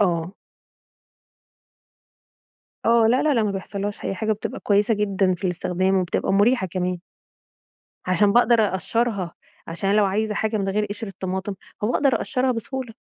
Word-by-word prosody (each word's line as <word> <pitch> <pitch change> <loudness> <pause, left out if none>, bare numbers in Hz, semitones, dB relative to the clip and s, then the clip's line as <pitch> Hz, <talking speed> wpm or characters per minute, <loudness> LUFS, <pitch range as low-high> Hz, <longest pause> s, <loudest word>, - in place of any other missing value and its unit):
آه. 175 -2 +1 2.5
آه، 230 -1 +5
لا 250 +5 +3
لا 300 -2 +3
لأ 230 -3 +2
ما 205 - 0
بيحصلّهاش 200 +1 -5
أي 195 - -2
حاجة، 220 +2 -1
بتبقى 210 - -6
كويسة 210 +2 +2
جدًا 195 -3 +1
في 180 - -16
الاستخدام، 185 +1 0
وبتبقى 185 +1 0
مُريحة 205 0 +3
كمان. 180 0 -2 1.1
عشان 190 +3 +3
بأقدر 240 -1 +5
أقشّرها، 200 -1 -1 0.3
عشان 170 +4 -2
أنا 205 - +3
لو 205 - +4
عايزة 210 +2 -1
حاجة 220 0 0
من 195 -1 -1
غير 210 +2 0
قِشر 210 +1 -5
الطماطم، 190 +1 -4 0.3
فباقدر 250 +5 +2
أقشّرها 255 0 0
بسهولة. 245 0 -5
205 Hz, 145 wpm, -23 LUFS, 190-225 Hz, 2.5 s, آه